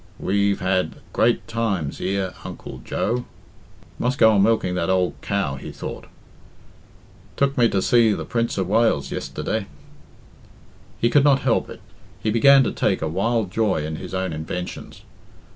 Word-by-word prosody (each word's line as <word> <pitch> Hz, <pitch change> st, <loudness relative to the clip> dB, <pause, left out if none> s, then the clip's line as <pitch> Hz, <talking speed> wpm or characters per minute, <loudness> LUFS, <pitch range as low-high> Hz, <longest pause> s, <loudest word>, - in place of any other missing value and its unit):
"Weve 100 Hz, 0 st, 0 dB
had 95 Hz, 0 st, 0 dB, 0.2 s
grate 120 Hz, +1 st, +2 dB
times 100 Hz, -10 st, -2 dB
ear 95 Hz, -1 st, -1 dB
uncle -, -, -8 dB
Jo 120 Hz, +3 st, -2 dB, 0.4 s
" -, -, -26 dB
"Must 125 Hz, +3 st, 0 dB
go 110 Hz, -4 st, +6 dB
on 100 Hz, -2 st, +3 dB
milking 105 Hz, -3 st, +2 dB
that 90 Hz, -1 st, -1 dB
ould 95 Hz, -1 st, +2 dB
cow," 95 Hz, -10 st, -1 dB
he -, -, -8 dB
thought -, -, -7 dB, 1.3 s
"tuk 140 Hz, 0 st, +1 dB
me 120 Hz, -2 st, +4 dB
to 95 Hz, -, 0 dB
sea 115 Hz, -2 st, +4 dB
the -, -, -4 dB
prins 115 Hz, -2 st, -1 dB
of 95 Hz, -2 st, 0 dB
Wales 110 Hz, -8 st, +2 dB
yesterda" 110 Hz, -3 st, -3 dB, 1.3 s
He 120 Hz, -, +2 dB
could 145 Hz, +1 st, +5 dB
not 140 Hz, -1 st, +4 dB
help 125 Hz, -, +1 dB
it -, -, -10 dB, 0.4 s
he 110 Hz, -, -1 dB
began 135 Hz, +5 st, +6 dB
to -, -, -1 dB
take -, -, 0 dB
a -, -, 0 dB
wild 100 Hz, +4 st, 0 dB
joy 100 Hz, -8 st, 0 dB
in 80 Hz, 0 st, -4 dB
his 95 Hz, +1 st, -7 dB
own 95 Hz, -2 st, -2 dB
inventions. 80 Hz, +3 st, -6 dB
100 Hz, 160 wpm, -22 LUFS, 90-115 Hz, 1.3 s, go